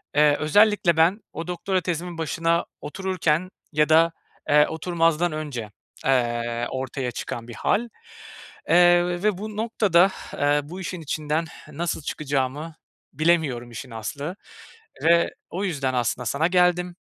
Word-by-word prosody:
eee, 150 -1 +5
özellikle 185 +1 +3
ben 175 +6 +4
o 165 +2 -6
doktora 185 +1 -1
tezimin 175 0 -4
başına 165 +1 0 0.2
otururken 185 -1 -1 0.2
ya 150 +1 +3
da, 165 +1 +5 0.4
eee, 150 0 +6
oturmazdan 165 0 +1
önce, 140 -9 -5 0.3
eee, 120 -2 0
ortaya 130 -1 -3
çıkan 115 0 -6
bir 120 - -8
hâl, 235 - 0 0.8
eee, 175 0 +6 0.2
ve 210 -4 +2
bu 215 +1 -7
noktada, 195 -5 +3 0.2
eee, 145 +1 +2
bu 180 +6 -8
işin 180 -1 -5
içinden 155 +1 -2 0.3
nasıl 165 +1 -3
çıkacağımı 145 +2 -3 0.4
bilemiyorum 150 -7 +1
işin 120 +2 -8
aslı 140 - -5 0.7
ve 170 +1 +4 0.2
o 190 +4 -4
yüzden 135 -7 -1
aslında 120 +1 -1
sana 150 +8 +1
geldim. 180 -1 +2
160 Hz, 130 wpm, -24 LUFS, 140-175 Hz, 0.8 s, eee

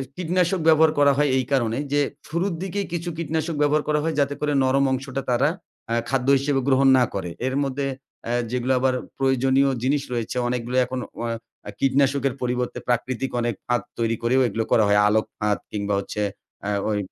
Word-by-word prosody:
কীটনাশক 180 +1 0
ব্যবহার 160 0 +6
করা 140 -1 +6
হয় 145 -1 +3
এই 130 - 0
কারণে, 120 -3 +1 0.2
যে 145 - +3 0.3
শুরুর 170 +3 -1
দিকে 195 +2 -3
কিছু 170 +1 -3
কীটনাশক 160 0 -2
ব্যবহার 150 +1 +3
করা 150 0 +2
হয় 160 -2 -1
যাতে 140 0 +1
করে 150 0 0
নরম 135 +1 +3
অংশটা 135 +1 -2
তারা 135 +5 +3 0.4
আ - - +2 0.2
খাদ্য 135 -1 0
হিসেবে 140 0 0
গ্রহণ 135 0 +4
না 125 - +5
করে। 95 -3 -3 0.2
এর 130 - -1
মধ্যে 135 +1 -2 0.4
অ্যা 120 - -2 0.2
যেগুলো 125 +1 0
আবার 130 0 +2 0.2
প্রয়োজনীয় 135 +1 +2
জিনিস 140 +2 +2
রয়েছে, 120 +1 -3
অনেকগুলো 125 +1 -2
এখন 130 +1 -4 0.2
অ - - -2 0.4
আ - - -4
কীটনাশকের 135 0 +2
পরিবর্তে 125 0 -2
প্রাকৃতিক 125 +2 -1
অনেক 120 -3 -1
ফাঁদ 120 -3 +1 0.2
তৈরি 115 0 +1
করেও 130 +3 +3
এগুলো 115 +1 -2
করা 110 - +5
হয়। 105 0 +4
আলোক 110 +1 +2
ফাঁদ 105 -1 +1
কিংবা 100 -1 -2
হচ্ছে 105 +1 -4 0.4
অ্যা 105 - -2 0.2
ওই 105 - 0
130 Hz, 185 wpm, -23 LUFS, 120-145 Hz, 0.4 s, ব্যবহার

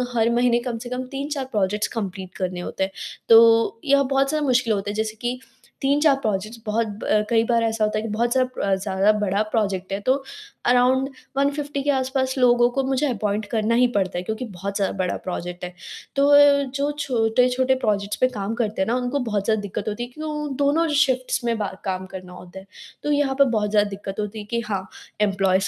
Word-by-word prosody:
हर 230 0 +3
महीने 240 0 +3
कम 240 -1 -4
से 240 +2 -8
कम 250 +1 -3
3-4 280 0 -3
projects 210 0 0
complete 190 -4 -5
करने 180 -1 -3
होते 180 - -3
हैं। 190 - -2 0.4
तो 230 0 +6
यह 280 0 +4
बहुत 275 +1 +1
सा 310 0 0
मुश्किल 255 -5 +2
होता 200 0 -2
है - - -3
जैसे 220 0 -2
कि 245 +1 -2 0.4
3-4 285 +1 +3
प्रोजेक्ट्स 215 -2 -3
बहुत 220 +1 0 0.2
ब 210 0 +2
कई 225 -1 +3
बार 235 0 +2
ऐसा 225 -1 0
होता 215 0 +1
है - - 0
कि 225 - -4
बहुत 235 +3 0
सारा 255 -6 0
ज़्यादा 195 +1 +2
बड़ा 200 0 +1
प्रोजेक्ट 195 -4 -1
है 195 - -1
तो 255 +5 +3 0.5
अराउंड 255 +2 +3 0.3
150 285 +1 0
के 290 - -1
आस-पास 260 -1 0
लोगों 245 -1 +4
को 270 - +2
मुझे 265 +2 0
अपॉइंट 210 -3 -1
करना 225 0 +1
ही 250 +1 +5
पड़ता 190 -3 0
है 180 - -3
क्योंकि 220 +6 -4
बहुत 195 +3 -5
ज़्यादा 200 -2 0
बड़ा 185 -1 -1
प्रोजेक्ट 180 -1 -5
है। 180 0 -5 0.4
तो 280 0 +3
अ, 285 -1 +6
जो 280 +2 -2
छोटे-छोटे 250 +1 +2
प्रोजेक्ट्स 205 -1 0
पे 255 - +6
काम 210 -4 -4
करते 220 -4 -1
हैं 190 - +1
ना, 235 - +1
उनको 250 +3 -1
बहुत 210 -6 -2
ज़्यादा 220 -2 +1
दिक्कत 205 0 -5
होती 215 +3 -4
है 240 - -7
क्योंकि 310 +2 -5
वो 300 0 -3 0.2
दोनों 315 +4 +2 0.2
शिफ्ट्स 255 -2 -1
में 230 -1 0
बा 210 -2 -1 0.2
काम 185 -1 -2
करना 185 -1 -8
होता 180 +1 -11
है। 190 - -14 0.4
तो 295 - 0
यहाँ 285 -2 +1
पर 280 - +7
बहुत 210 -1 0
ज़्यादा 210 -1 +3
दिक्कत 195 -1 -6
होती 210 +1 -4
है 210 - -7
कि 235 - +1
हाँ, 195 -3 -3 0.3
इम्प्लॉइज 195 -1 +2
230 Hz, 215 wpm, -23 LUFS, 200-260 Hz, 0.5 s, पर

